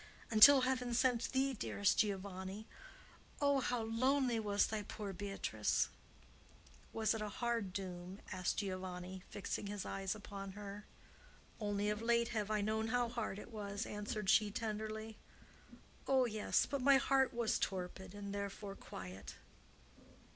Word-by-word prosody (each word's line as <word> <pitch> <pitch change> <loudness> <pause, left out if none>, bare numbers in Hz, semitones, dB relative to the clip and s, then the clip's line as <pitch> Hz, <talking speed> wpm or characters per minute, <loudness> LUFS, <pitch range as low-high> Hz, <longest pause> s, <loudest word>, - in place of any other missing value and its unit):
Until 260 +5 +10
Heaven 250 -2 0
sent 245 -1 +2
thee, 270 +1 +2
dearest 200 -3 +1
Giovanni, 195 0 -2 0.7
oh, 280 -1 +3
how 245 -2 0
lonely 250 +2 +2
was 205 -1 +2
thy 215 -1 -2
poor 205 -1 -6
Beatrice!" 195 +1 0 1.0
"Was 220 -1 +1
it 225 - -3
a 210 - -2
hard 230 -2 -1
doom?" 185 0 -6
asked 185 -2 -1
Giovanni, 185 -2 -4
fixing 205 0 -4
his 205 -1 -4
eyes 195 +1 -2
upon 200 -2 -7
her. 205 0 -8 0.7
"Only 205 -1 0
of 210 +1 -3
late 235 0 +2
have 215 -3 -1
I 215 -1 +1
known 220 +2 0
how 245 +1 +1
hard 230 -4 -3
it 220 - -9
was," 205 -1 -4
answered 210 0 -4
she, 210 +1 +5
tenderly. 220 +1 -4 0.9
"Oh, 265 -2 +4
yes; 215 -3 +1
but 280 0 -2
my 275 +1 +7
heart 265 -1 +3
was 235 -3 0
torpid, 190 +1 -3
and 200 -1 -5
therefore 200 0 -4
quiet." 95 - -8
210 Hz, 140 wpm, -37 LUFS, 200-235 Hz, 1.0 s, Until